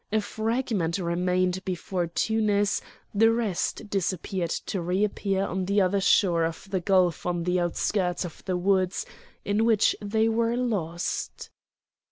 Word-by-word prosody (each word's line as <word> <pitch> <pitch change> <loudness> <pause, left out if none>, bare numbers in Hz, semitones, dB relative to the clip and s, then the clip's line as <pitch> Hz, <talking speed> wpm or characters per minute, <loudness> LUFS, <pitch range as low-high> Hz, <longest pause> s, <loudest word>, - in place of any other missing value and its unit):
A 215 - +3
fragment 220 -4 -1
remained 180 +1 0
before 180 -1 -2
Tunis, 205 +2 +1 0.3
the 225 +2 +5
rest 220 -2 -1
disappeared 185 -2 -2 0.2
to 195 - -2
re 180 +4 0
appear 195 -2 0
on 185 0 -2
the 200 +2 +2
other 195 +1 +2
shore 175 -4 +3
of 165 +4 -3
the 190 - +1
gulf 180 -2 +2
on 175 -1 -1
the 180 +1 +1
outskirts 180 +1 0
of 170 - -10
the 185 -2 0
woods 185 0 +1 0.4
in 205 +2 +1
which 225 -2 +3
they 220 +2 +1
were 230 +1 +1
lost. 185 -9 -3
190 Hz, 145 wpm, -26 LUFS, 180-210 Hz, 0.4 s, the